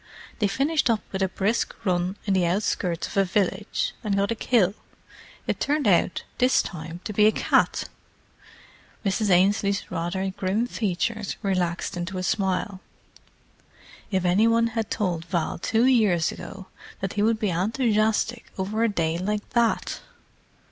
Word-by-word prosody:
They 210 - +3
finished 275 +6 +1
up 225 -2 +2
with 190 - -3
a 190 - +2
brisk 200 +5 -1
run 180 +1 0
in 200 - +1
the 180 -2 +2
outskirts 180 -2 -1
of - - -7
a 195 - +5
village, 205 - -1
and 205 -3 0
got 200 +2 +1
a - - 0
kill—it 215 -4 -2
turned 290 -3 +1
out 180 -1 +2 0.2
this 255 +1 +4
time 165 0 -7
to 210 - -5
be 210 +1 +5
a - - +5
cat!" - - +2 1.2
Mrs. 200 +2 +1
Ainslie's 200 +2 +2
rather 180 +3 -2
grim 195 +5 -1
features 215 -1 -2
relaxed 180 -2 -1
into 175 +2 -4
a 185 - -3
smile. 190 0 -1 1.3
"If 185 -3 0
any 190 +6 +4
one 230 0 +3
had 225 -2 -2
told 175 -5 -1
Val 170 -2 -2
two 225 +6 +2
years 210 -10 +3
ago 195 -1 -9 0.3
that 195 -1 -3
he 205 - -1
would 225 +1 +3
be 210 -3 0
enthusiastic 220 +4 +1
over 205 +4 -1
a 230 - +3
day 165 -4 -1
like 210 +3 -3
that!" 235 -2 +1
200 Hz, 155 wpm, -25 LUFS, 185-220 Hz, 1.3 s, a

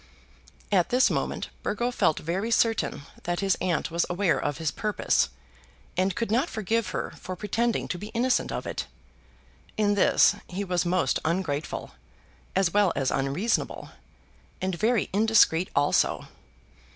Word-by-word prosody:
At 185 -4 +3
this 250 +1 +4
moment - - -2
Burgo 240 +4 -1
felt 160 -9 +2
very 185 +8 -2
certain 225 -10 +1 0.2
that 175 +1 -2
his 195 -2 +2
aunt 175 -2 0
was 170 +1 +1
aware 180 0 +1
of 145 -2 -2
his 160 -3 -1
purpose, 210 +10 +1 0.7
and 185 +1 +1
could 230 -3 -2
not 255 +9 +2
forgive 220 +1 -1
her - - -4
for 185 - -6
pretending 225 +4 -1
to 180 - -3
be 210 - -6
innocent 240 +3 0
of - - -4
it. - - -4 0.9
In 205 -1 +3
this 200 - +4
he 190 +3 -4
was 180 -2 0
most 175 -7 +1
ungrateful, 160 -3 -2 0.6
as 190 -3 +2
well 205 -3 +4
as 135 -1 0
unreasonable, 145 +12 -1 0.7
and 185 0 -2
very 220 +4 +1
indiscreet 205 -5 +4
also. 145 +1 +2
190 Hz, 145 wpm, -26 LUFS, 170-220 Hz, 0.9 s, this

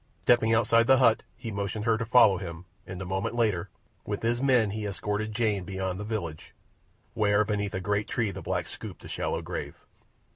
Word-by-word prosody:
Stepping 120 -2 +4
outside 115 +1 +4
the 135 0 +6
hut, 115 -4 +4 0.2
he 115 -2 -6
motioned 100 +1 -3
her 115 -1 +3
to 115 0 -3
follow 110 -5 +6
him, 85 -2 -7 0.2
and 90 -1 -6
a 95 - -5
moment 95 +5 -2
later, 105 -7 0 0.3
with 105 0 -4
his 120 +2 +1
men, 125 -6 +3
he 105 0 -3
escorted 105 +2 -3
Jane 105 -3 0
beyond 95 0 -3
the - - -4
village, 100 -8 -5 0.6
where 105 0 +3
beneath 105 -2 -2
a - - -1
great 105 +3 -1
tree 115 -4 -1
the - - -7
blacks - - -2
scooped - - -9
a - - -7
shallow - - -2
grave. - - -5
105 Hz, 195 wpm, -28 LUFS, 100-115 Hz, 0.6 s, the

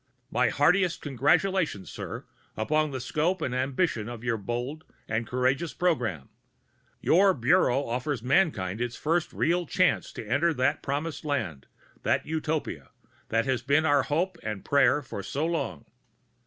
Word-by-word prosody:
My 125 -2 +3
heartiest 180 - +2
congratulations, 145 - +1
sir, - - -6 0.3
upon 155 +7 +1
the 135 -2 -4
scope 160 +8 0
and 130 -6 -2
ambition 130 - 0
of 120 -1 -8
your 120 -2 +1
bold 120 +8 -4 0.2
and 110 +1 -1
courageous 130 +6 0
program. 120 - 0 0.7
Your 190 +2 +4
Bureau 140 +1 +3
offers 125 +1 -2
mankind 120 - +1
its 120 -1 -2
first 165 +2 0
real 175 +1 0
chance 185 +4 +1
to 110 - -7
enter 160 +8 +2
that 130 +4 +1
promised 145 +2 -3
land, 105 - -3 0.3
that - - +1
Utopia, 155 0 -3 0.4
that 115 +1 +1
has 130 -3 0
been 140 +5 +2
our 145 -2 +4
hope 170 +5 -1
and 105 -3 -5
prayer 140 +1 +3
for 110 -5 -6
so 140 +10 -2
long. 140 - -2
140 Hz, 145 wpm, -27 LUFS, 120-160 Hz, 0.7 s, Your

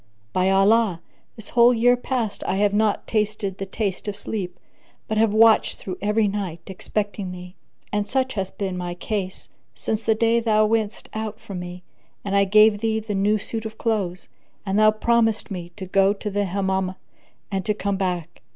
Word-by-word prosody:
By 185 +1 +2
Allah, 195 -1 +4 0.4
this 220 -2 -9
whole 240 0 +5
year 245 +2 +5
past 245 -3 -3
I - - +1
have 205 +1 +2
not 210 0 +1
tasted 210 -3 -1
the 195 - -4
taste 195 0 -3
of 205 - -2
sleep, 195 -3 -2 0.5
but 215 0 0
have 225 -1 +4
watched 220 +1 +5
through 185 -1 -7
every 210 +1 +2
night, 195 -5 -3
expecting 200 0 -3
thee; 180 0 -9 0.4
and 205 0 0
such 260 -1 0
hath 190 -2 -4
been 190 -2 -2
my 175 -1 -4
case 190 0 -4 0.3
since 220 0 -3
the 220 - +2
day 230 +1 +3
thou 215 -2 +3
wentest 215 -1 -1
out 220 0 -4
from 195 -3 -7
me 180 0 -8 0.4
and 200 0 -1
I 200 0 +5
gave 215 +1 +5
thee 220 0 0
the 215 -1 -5
new 205 +2 +2
suit 220 +2 -4
of 220 0 -7
clothes, 195 -6 -2 0.4
and 195 +1 +1
thou 215 0 +7
promisedst 225 0 +1
me 175 -3 -5
to 190 - -5
go 195 +2 +3
to 210 0 -5
the 205 +1 0
Hammam 190 0 -1 0.6
and 190 -1 -1
to 210 - 0
come 200 -1 -1
back! 180 -4 -3
205 Hz, 190 wpm, -23 LUFS, 190-220 Hz, 0.6 s, thou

